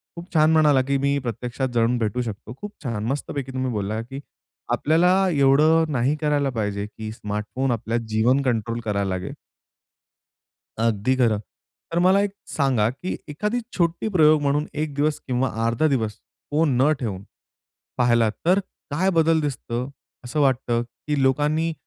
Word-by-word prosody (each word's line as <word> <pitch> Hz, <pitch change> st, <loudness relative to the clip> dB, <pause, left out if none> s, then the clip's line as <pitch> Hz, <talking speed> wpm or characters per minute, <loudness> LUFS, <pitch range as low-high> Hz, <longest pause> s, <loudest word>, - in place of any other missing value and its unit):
खूप 175 Hz, +2 st, -10 dB
छान 155 Hz, 0 st, +5 dB
म्हणाला, 150 Hz, -4 st, +5 dB
की 140 Hz, +1 st, 0 dB
मी 140 Hz, +1 st, +1 dB
प्रत्यक्षात 125 Hz, +3 st, -3 dB
जाऊन 120 Hz, +1 st, +2 dB
भेटू 115 Hz, +2 st, -1 dB
शकतो. 110 Hz, 0 st, -6 dB
खूप 205 Hz, 0 st, -6 dB
छान. 115 Hz, -5 st, -3 dB
मस्तपैकी 135 Hz, 0 st, -3 dB
तुम्ही 130 Hz, -1 st, -2 dB
बोलला, 105 Hz, +1 st, -2 dB
की 135 Hz, +4 st, -8 dB, 0.5 s
आपल्याला 165 Hz, +4 st, +3 dB, 0.2 s
एवढं 155 Hz, +3 st, +4 dB
नाही 135 Hz, +2 st, +1 dB
करायला 145 Hz, -2 st, +1 dB
पाहिजे 105 Hz, -2 st, -2 dB
की 110 Hz, 0 st, -8 dB
स्मार्टफोन 105 Hz, +5 st, -3 dB
आपल्या 115 Hz, 0 st, -1 dB
जीवन 115 Hz, +5 st, +2 dB
कंट्रोल 115 Hz, -2 st, -1 dB
करायला 100 Hz, -2 st, -1 dB
लागेल. 95 Hz, -1 st, -4 dB, 1.5 s
अगदी 115 Hz, +3 st, +1 dB
खरं 115 Hz, -5 st, +2 dB, 0.5 s
तर 170 Hz, -, +1 dB
मला 185 Hz, +3 st, +4 dB
एक 205 Hz, -1 st, 0 dB, 0.2 s
सांगा, 130 Hz, -7 st, +1 dB
की 135 Hz, +9 st, -5 dB
एखादी 210 Hz, +11 st, -2 dB, 0.2 s
छोटी 170 Hz, +4 st, 0 dB
प्रयोग 155 Hz, -2 st, +6 dB
म्हणून 145 Hz, +2 st, +1 dB, 0.2 s
एक 150 Hz, -3 st, -4 dB
दिवस 150 Hz, +1 st, 0 dB
किंवा 130 Hz, 0 st, 0 dB, 0.2 s
अर्धा 115 Hz, +7 st, +2 dB
दिवस 115 Hz, -7 st, 0 dB, 0.4 s
फोन 150 Hz, -3 st, +2 dB
न 145 Hz, -, +5 dB
ठेवून 100 Hz, -6 st, -3 dB, 0.8 s
पाहिलात 120 Hz, -3 st, +3 dB
तर 185 Hz, +3 st, +5 dB, 0.3 s
काय 185 Hz, +7 st, +1 dB
बदल 165 Hz, -1 st, +3 dB
दिसत 140 Hz, -5 st, -4 dB, 0.5 s
असं 130 Hz, +5 st, -2 dB
वाटतं, 125 Hz, -4 st, +2 dB
की 135 Hz, +4 st, -4 dB
लोकांनी 150 Hz, +5 st, +1 dB
135 Hz, 150 wpm, -23 LUFS, 115-150 Hz, 1.5 s, प्रयोग